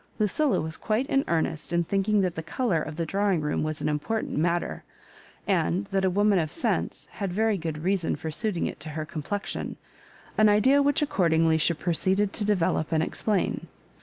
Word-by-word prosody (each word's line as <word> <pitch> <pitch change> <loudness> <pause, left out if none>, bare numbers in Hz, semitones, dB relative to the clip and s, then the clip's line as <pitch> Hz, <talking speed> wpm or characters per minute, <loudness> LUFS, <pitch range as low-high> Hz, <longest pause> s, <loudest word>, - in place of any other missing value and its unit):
Lucilla 245 +7 +2
was 160 0 -4
quite 220 +4 0
in 275 0 +1
earnest 160 -1 -1
in 170 0 +2
thinking 200 +3 +1
that 180 -2 0
the 160 - -4
colour 170 +1 0
of 155 0 -5
the 165 0 -2
drawing 195 +1 +1
room 150 -1 -1
was 155 0 -3
an - - +1
important 150 +10 -2
matter, 170 +3 0 0.6
and 90 +4 +1
that 195 0 +1
a 190 - +3
woman 200 +1 +3
of 155 -2 -2
sense - - -2
had 200 -4 -4
very 220 +3 +2
good 160 -4 -4
reason 190 -2 +1
for 160 - -5
suiting 200 +1 -1
it - - -5
to 155 - -7
her 155 - -2
complexion 170 +6 -4 0.3
— - - -25
an 215 0 +6
idea 260 +7 +5
which 285 +1 +2
ac 295 - -3
cordingly 160 -3 +3
she 170 +2 +2
proceeded 190 +5 0
to 215 - -1
develop 185 -6 +1
and 160 -1 +2
explain. 205 +3 -1
180 Hz, 195 wpm, -26 LUFS, 160-210 Hz, 0.6 s, an